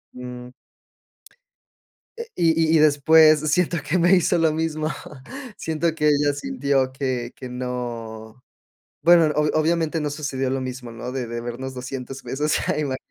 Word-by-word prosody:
Eh, 125 0 -8
mm. 125 0 -9 1.6
Eh, 465 0 -6
y 165 -1 +2
y - - +6
y - - +3
después 155 +1 +6
siento 175 0 +1
que 170 - +1
me 175 +2 +5
hizo 180 0 +2
lo 160 -2 +2
mismo, 155 -1 -2 0.7
siento 160 0 -1
que 150 -1 +1
ella 145 0 +2
sintió 140 - -1
que 130 -3 -3
que 130 - -8
no 120 -2 -6 0.6
bueno, 170 -1 +6
obv 150 0 +2
obviamente 160 0 +1
no 150 - -1
sucedió 140 -3 -3
lo 130 0 -2
mismo, 125 -1 -6
¿no?, 120 +2 -7
de 130 -2 -3
debernos 120 +3 -5
$200 130 +1 -7
pesos. 150 +2 -1 0.2
Ima 140 -3 -1
145 Hz, 150 wpm, -23 LUFS, 125-160 Hz, 1.6 s, y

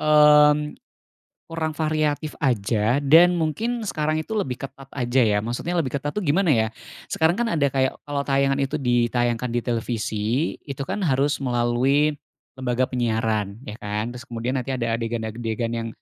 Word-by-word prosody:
mmm, 150 -1 +6 0.9
kurang 160 -1 -2
variatif 155 -1 0
aja, 115 0 +1
dan 165 +5 +6
mungkin 225 +10 -1
sekarang 155 -3 -1
itu 220 - -7
lebih 130 -11 -3
ketat 135 0 -13
aja 125 0 +1
ya. 105 -1 +2
Maksudnya 120 +10 -3
lebih 150 -6 0
ketat 145 +1 -4
tuh 210 - -1
gimana 165 +3 +3
ya, 110 -1 +2 0.4
sekarang 160 +1 +2
kan 240 - +1
ada 150 -4 +2
kayak 130 -1 0
kalau 145 -1 -2
tayangan 135 0 +2
itu 140 +3 -1
ditayangkan 120 -1 +1
di 120 0 0
televisi, 115 +2 -1
itu 140 -1 -6
kan 210 - -3
harus 140 0 +2
melalui 130 +4 +2 0.5
lembaga 130 0 +1
penyiaran, 110 -4 -1
ya, 105 - -6
kan? 105 +3 -3
Terus 125 - -9
kemudian 120 +3 -3
nanti 125 - -6
ada 115 -3 -1
adegan-adegan 115 0 -3
yang 115 -1 -3
130 Hz, 155 wpm, -23 LUFS, 115-150 Hz, 0.9 s, mmm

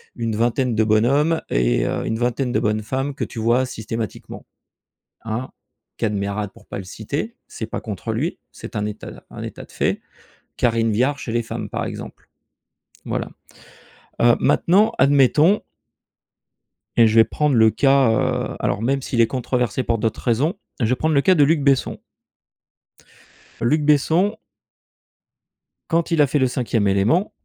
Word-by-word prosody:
une 115 -2 -2
vingtaine 120 +2 +1
de 110 - +3
bonhommes 135 +10 +2
et - - +1
heu, - - -2
une 110 - -1
vingtaine 125 +2 -1
de 110 - +2
bonnes 110 -1 0
femmes 135 +5 -2
que - - -2
tu 115 - -8
vois 120 +3 +2
systématiquement, 115 -2 -6 0.8
hein. 115 +3 -3 0.5
Kad 110 -2 -1
Merad 100 0 -3
pour - - -19
pas - - -6
le 100 - -6
citer, 140 - -5
c'est 110 - -6
pas 110 - -5
contre 110 +1 -5
lui, 145 +11 -2
c'est - - -10
un 105 - -1
état 105 0 -6
d - - -12
un - - -7
état - - -8
de - - -22
fait. - - 0 0.6
Karine 115 -2 +1
Viard, 130 +7 +1
chez 120 - -5
les 120 +1 +1
femmes, 115 - -5
par - - -3
exemple. - - -8 0.8
Voilà, - - -3 0.9
heu, 120 0 +5
maintenant, 205 +6 +3
admettons 145 +7 +4 1.4
et 115 - +7
je 110 - 0
vais 115 - +8
prendre 150 +3 0
le 110 -1 +6
cas, 135 +1 +3
heu, 110 - -1
alors - - -1
même 135 +4 0
s'il 120 -2 0
est 115 - +4
controversé 125 -1 -1
pour 115 -1 0
d'autres 110 0 -2
raisons, 135 - +1 0.2
je 120 - +1
vais 125 +3 +2
prendre 155 +4 0
le 140 - +5
cas 185 +5 +4
de 150 - +5
Luc 155 +1 +3
Besson. 140 -2 +1 1.6
Luc 150 +6 +2
Besson 160 +8 +2 1.5
quand 170 0 0
il 165 -2 +3
a 145 - +5
fait 145 - 0
Le 130 - +3
Cinquième 120 -4 0
Élément 105 - +2
120 Hz, 170 wpm, -21 LUFS, 110-145 Hz, 1.6 s, vais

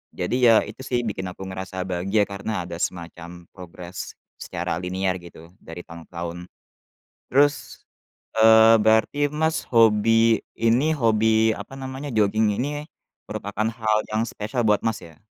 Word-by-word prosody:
Jadi, 90 +7 -2 0.2
ya, 110 - +5
itu, - - -10
sih, 120 -1 0
bikin 95 -4 -4
aku - - -9
ngerasa 95 0 -5
bahagia 95 +3 0
karena 100 -1 -4
ada 85 0 -7
semacam 85 0 -6
progres 90 0 -9 0.2
secara - - -4
linear, 95 +1 -2
gitu, 85 -1 -14
dari 85 +2 -9
tahun 85 0 -11
ke - - -55
tahun. 85 0 -5 0.9
Terus, 145 +2 +1 0.6
eee, 110 0 +7
berarti, 110 +7 +3
Mas, 160 +1 0
hobi 115 0 +4 0.2
ini 120 +8 +2
hobi 110 -3 +3
apa - - -9
namanya, 130 +2 -6
joging 105 0 +2
ini 145 +3 -3 0.4
merupakan 105 +2 -3
hal 110 -2 0
yang 110 +1 0
spesial 115 +4 -3
buat, 105 -1 +3
Mas, 110 -3 -2
ya? 80 -2 -14
110 Hz, 145 wpm, -23 LUFS, 90-115 Hz, 0.9 s, eee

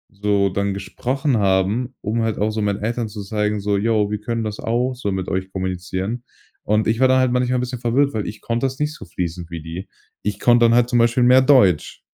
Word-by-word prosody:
so 100 -1 +1
dann 100 +1 -1
gesprochen 130 +6 -1
haben, 100 +6 +1
um 110 +3 -1
halt 115 -2 -1
auch 105 +2 0
so 110 0 -3
meinen 100 -1 -1
Eltern 115 +1 -1
zu 105 -1 -7
zeigen, 105 +1 -1
so: 100 0 0
„Ja, 110 +4 0 0.2
wir 105 0 -2
können 115 +1 -2
das 105 -1 -4
auch 120 +3 0
so 105 -5 -3
mit 95 -1 -3
euch 95 0 -3
kommunizieren.“ 95 +5 -3 0.4
Und 105 +1 +1
ich 115 +2 +1
war 130 - +5
da 130 0 +4
halt 130 -1 +2
manchmal 125 0 +1
'n 125 - 0
bisschen 125 -1 -4
verwirrt, 135 +4 +1
weil 110 -2 -2
ich 110 - -7
konnte 120 +2 -1
das 130 +2 -7
nicht 150 0 -1
so 100 - -11
fließend 85 -1 -5
wie 85 -2 -6
die. 85 +4 -7 0.3
Ich 105 -1 -3
konnte 120 -1 +5
dann 115 - +4
halt 120 0 +4
zum 120 -1 +2
Beispiel 120 +2 +3
mehr 125 +1 +6
Deutsch. 125 - +3
110 Hz, 235 wpm, -21 LUFS, 100-120 Hz, 0.4 s, mehr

